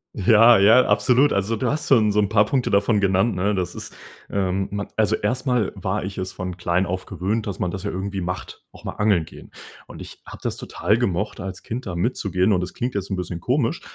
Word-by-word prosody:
Ja, 110 Hz, +2 st, +6 dB
ja, 115 Hz, +6 st, +6 dB
absolut. 125 Hz, +7 st, +3 dB
Also, 100 Hz, +3 st, 0 dB
du 125 Hz, +3 st, -1 dB
hast 150 Hz, 0 st, -3 dB
schon 110 Hz, -6 st, +4 dB
so 105 Hz, -, +1 dB
'n 100 Hz, -, +1 dB
paar 105 Hz, -1 st, +4 dB
Punkte 130 Hz, 0 st, 0 dB
davon 100 Hz, +1 st, +2 dB
genannt, 95 Hz, +3 st, +2 dB
ne? 100 Hz, +3 st, 0 dB
Das 90 Hz, -3 st, -2 dB
ist. -, -, -9 dB, 0.3 s
Ähm, 95 Hz, 0 st, -1 dB
man 105 Hz, 0 st, -4 dB
also 110 Hz, 0 st, +2 dB
erstmal 125 Hz, 0 st, -1 dB
war 95 Hz, 0 st, -2 dB
ich 95 Hz, 0 st, -6 dB
es 95 Hz, 0 st, -4 dB
von 90 Hz, -1 st, -6 dB
klein 90 Hz, +1 st, 0 dB
auf 90 Hz, +1 st, -4 dB
gewöhnt, 105 Hz, +4 st, -2 dB
dass 100 Hz, -, -4 dB
man 90 Hz, -, -2 dB
das 95 Hz, 0 st, -5 dB
ja 100 Hz, -, -3 dB
irgendwie 95 Hz, +1 st, -4 dB
macht, 90 Hz, 0 st, -6 dB
auch -, -, -16 dB
mal -, -, -4 dB
angeln 100 Hz, -6 st, +1 dB
gehen. -, -, -14 dB, 0.4 s
Und -, -, -9 dB
ich -, -, -12 dB
habe -, -, -9 dB
das -, -, -2 dB
total 105 Hz, -, 0 dB
gemocht, 105 Hz, -3 st, -1 dB
als 95 Hz, 0 st, -7 dB
Kind 115 Hz, 0 st, -5 dB
da 90 Hz, -, -4 dB
mitzugehen. 100 Hz, -1 st, 0 dB
Und 90 Hz, -, +1 dB
das 90 Hz, -, -6 dB
klingt 125 Hz, +1 st, -3 dB
jetzt 100 Hz, -1 st, -3 dB
'n 95 Hz, -, -1 dB
bisschen 90 Hz, -1 st, -5 dB
komisch, 130 Hz, -, 0 dB
100 Hz, 230 wpm, -22 LUFS, 95-110 Hz, 0.4 s, Ja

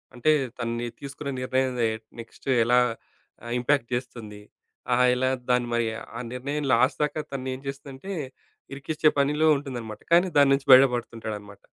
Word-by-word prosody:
అంటే 140 Hz, +6 st, +2 dB, 0.3 s
తనని 120 Hz, 0 st, -3 dB
తీసుకున్న 140 Hz, +1 st, -7 dB
నిర్ణయం 130 Hz, 0 st, 0 dB
నె 115 Hz, -, +3 dB, 0.3 s
నెక్స్ట్ 115 Hz, +3 st, -12 dB, 0.2 s
ఎలా 125 Hz, +2 st, +4 dB, 0.7 s
ఆహ్, 120 Hz, -, -6 dB
ఇంపాక్ట్ 125 Hz, -1 st, +1 dB
చేస్తుంది? 115 Hz, -4 st, -5 dB, 0.5 s
ఆహ్, 125 Hz, +1 st, +4 dB
ఎలా 130 Hz, +1 st, +1 dB, 0.2 s
దాన్ని 125 Hz, -1 st, +2 dB
మరి 115 Hz, -1 st, +1 dB, 0.3 s
ఆ -, -, -4 dB
నిర్ణయం 140 Hz, +3 st, -3 dB
లాస్ట్ 130 Hz, +6 st, +3 dB
దాకా 150 Hz, +1 st, -1 dB
తన 130 Hz, -1 st, -4 dB
ఏం 130 Hz, -, -7 dB
చేస్తుందంటే 140 Hz, +6 st, -7 dB, 0.6 s
ఇరికించే 150 Hz, +2 st, +1 dB
పనిలో 150 Hz, +3 st, +2 dB
ఉంటుందన్నమాట. 120 Hz, -6 st, -7 dB
కానీ 175 Hz, +2 st, +5 dB
దాని 140 Hz, -1 st, +6 dB
నుంచి 135 Hz, 0 st, -1 dB
బయట 130 Hz, +1 st, +10 dB
పడుతుంటాడనమాట. 110 Hz, -4 st, -6 dB
130 Hz, 150 wpm, -25 LUFS, 120-140 Hz, 0.7 s, బయట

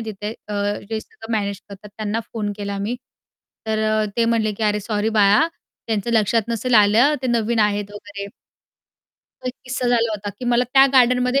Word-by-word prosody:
तिथे, 210 Hz, +2 st, -5 dB, 0.2 s
अ, 210 Hz, -, -4 dB, 0.4 s
जे 220 Hz, -, -2 dB
सगळं 225 Hz, +1 st, -10 dB
मॅनेज 200 Hz, -1 st, -3 dB
करतात, 200 Hz, +1 st, -11 dB
त्यांना 215 Hz, +1 st, -2 dB
फोन 210 Hz, -3 st, -2 dB
केला 200 Hz, -1 st, -4 dB
मी, 220 Hz, +5 st, -2 dB, 0.7 s
तर 220 Hz, 0 st, 0 dB
अ, 215 Hz, 0 st, +2 dB
ते 235 Hz, -, +3 dB
म्हटले, 225 Hz, -2 st, +1 dB
की 215 Hz, +2 st, -7 dB
"अरे 210 Hz, 0 st, +1 dB
सॉरी 210 Hz, +1 st, -1 dB
बाळा, 205 Hz, +9 st, +5 dB, 0.4 s
त्यांचं 220 Hz, +1 st, -1 dB
लक्षात 220 Hz, +1 st, +3 dB
नसेल 235 Hz, +2 st, 0 dB
आलं, 220 Hz, +8 st, +5 dB
ते 260 Hz, -, 0 dB
नवीन 235 Hz, -1 st, +1 dB
आहेत 205 Hz, -1 st, +1 dB
वगैरे." 205 Hz, -1 st, -8 dB, 1.2 s
तो -, -, -6 dB
एक -, -, -3 dB
किस्सा 250 Hz, 0 st, -2 dB
झाला 230 Hz, -2 st, +2 dB
होता, 205 Hz, -1 st, -4 dB
की 255 Hz, -, -6 dB
मला 240 Hz, 0 st, +2 dB
त्या 270 Hz, 0 st, +8 dB
गार्डनमध्ये 250 Hz, +1 st, +4 dB
220 Hz, 185 wpm, -21 LUFS, 205-235 Hz, 1.2 s, त्या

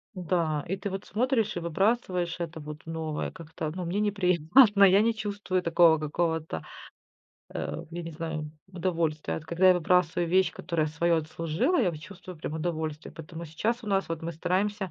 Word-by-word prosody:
М-да. 170 Hz, -4 st, 0 dB
И 190 Hz, +2 st, -2 dB
ты 195 Hz, +1 st, -4 dB
вот 195 Hz, +1 st, -5 dB
смотришь 225 Hz, -1 st, 0 dB
и -, -, -1 dB
выбрасываешь 180 Hz, 0 st, 0 dB
это 165 Hz, -1 st, -5 dB
вот 150 Hz, +1 st, -9 dB
новое 160 Hz, -2 st, -3 dB
как-то. 160 Hz, -2 st, -6 dB
Ну, 180 Hz, -2 st, -4 dB
мне 185 Hz, +5 st, -1 dB
неприятно. 200 Hz, -, +4 dB
Я 195 Hz, +2 st, +7 dB
не 230 Hz, +1 st, +2 dB
чувствую 205 Hz, -3 st, -2 dB
такого 170 Hz, -1 st, +5 dB
какого-то, 160 Hz, -, -2 dB, 0.9 s
э, 165 Hz, -, -4 dB
я 175 Hz, +1 st, -5 dB
не 165 Hz, -, -6 dB
знаю, 155 Hz, -1 st, -4 dB, 0.2 s
удовольствия. 165 Hz, -4 st, -1 dB
Вот 160 Hz, -, -6 dB
когда 175 Hz, +3 st, +3 dB
я 185 Hz, -, +7 dB
выбрасываю 175 Hz, 0 st, +2 dB
вещь, 185 Hz, +2 st, +3 dB
которая 160 Hz, -3 st, -1 dB
своё 165 Hz, +2 st, +1 dB
отслужила, 165 Hz, -, 0 dB
я 185 Hz, -6 st, +2 dB
вот 155 Hz, -2 st, -8 dB
чувствую 185 Hz, -1 st, -10 dB
прям 155 Hz, -, -5 dB
удовольствие. 160 Hz, -2 st, -3 dB
Поэтому 165 Hz, +1 st, -8 dB
сейчас 225 Hz, +10 st, -2 dB
у -, -, -10 dB
нас, 195 Hz, -3 st, +1 dB
вот 165 Hz, 0 st, -4 dB
мы 170 Hz, +1 st, -3 dB
стараемся 190 Hz, +3 st, -1 dB
170 Hz, 175 wpm, -28 LUFS, 160-190 Hz, 0.9 s, Я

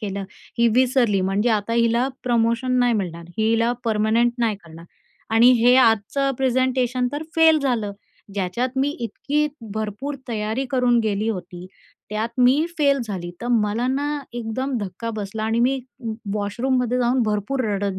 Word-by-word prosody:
केलं, 200 Hz, -2 st, -4 dB, 0.4 s
ही 235 Hz, 0 st, +5 dB
विसरली 250 Hz, -5 st, +3 dB
म्हणजे 195 Hz, +5 st, +1 dB
आता 215 Hz, +1 st, 0 dB
हिला 235 Hz, +2 st, +2 dB, 0.2 s
प्रमोशन 235 Hz, +1 st, +1 dB
नाही 245 Hz, -1 st, +3 dB
मिळणार, 170 Hz, -5 st, -3 dB
हिला 230 Hz, +2 st, +2 dB
पर्मनंट 225 Hz, +2 st, +2 dB
नाही 225 Hz, -4 st, +1 dB
करणार 165 Hz, 0 st, -12 dB, 0.5 s
आणि 235 Hz, +2 st, +7 dB
हे 245 Hz, +2 st, +6 dB
आजचं 255 Hz, +3 st, +3 dB
प्रेझेंटेशन 255 Hz, -1 st, +1 dB
तर 295 Hz, +2 st, -3 dB
फेल 320 Hz, -1 st, +6 dB
झालं." 240 Hz, -8 st, -1 dB, 0.4 s
ज्याच्यात 235 Hz, +7 st, -2 dB
मी 275 Hz, -, +2 dB
इतकी 285 Hz, +6 st, -1 dB, 0.3 s
भरपूर 220 Hz, +7 st, -4 dB
तयारी 220 Hz, +3 st, -2 dB
करून 250 Hz, -2 st, +3 dB
गेली 215 Hz, 0 st, -1 dB
होती 180 Hz, -3 st, -5 dB, 0.4 s
त्यात 215 Hz, +2 st, -1 dB
मी 260 Hz, +5 st, +4 dB
फेल 280 Hz, -2 st, +3 dB
झाली. 180 Hz, -5 st, -5 dB
तर 240 Hz, -, -5 dB
मला 225 Hz, +1 st, +1 dB
ना 280 Hz, +3 st, 0 dB, 0.2 s
एकदम 240 Hz, +3 st, -3 dB
धक्का 205 Hz, +3 st, -5 dB
बसला 210 Hz, +1 st, -4 dB
आणि 225 Hz, +1 st, +1 dB
मी 265 Hz, +2 st, +2 dB, 0.3 s
व 225 Hz, -, -2 dB, 0.3 s
वॉशरूममध्ये 250 Hz, +4 st, 0 dB
जाऊन 245 Hz, +1 st, +2 dB
भरपूर 215 Hz, +5 st, -1 dB
रडत 195 Hz, -1 st, -2 dB
230 Hz, 150 wpm, -22 LUFS, 210-255 Hz, 0.5 s, आणि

